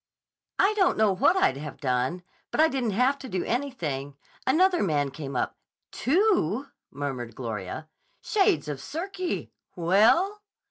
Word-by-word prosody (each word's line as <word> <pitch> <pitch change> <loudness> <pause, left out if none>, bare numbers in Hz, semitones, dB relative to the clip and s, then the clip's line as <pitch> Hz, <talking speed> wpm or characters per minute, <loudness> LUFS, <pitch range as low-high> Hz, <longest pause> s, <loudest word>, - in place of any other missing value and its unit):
"I 400 +2 +4
don't 380 -4 +2
know 215 -2 +4
what 340 - +3
I'd 135 - +3
have 150 +1 -7
done, 130 +6 -1 0.3
but - - -4
I 320 +1 +6
didn't 260 -6 -1
have 265 +3 +3
to 265 -2 -8
do 185 -3 -1
anything. 155 - -3 0.3
Another 355 +6 +4
man 145 -7 +1
came 135 0 -7
up—" - - -1 0.4
"Two!" 280 - +2 0.2
murmured 130 -5 -5
Gloria. 115 +4 -5 0.3
"Shades 270 - +2
of 145 -3 -4
Circe! 365 +3 -4 0.3
Well?" 220 - +3
200 Hz, 140 wpm, -27 LUFS, -, 0.4 s, I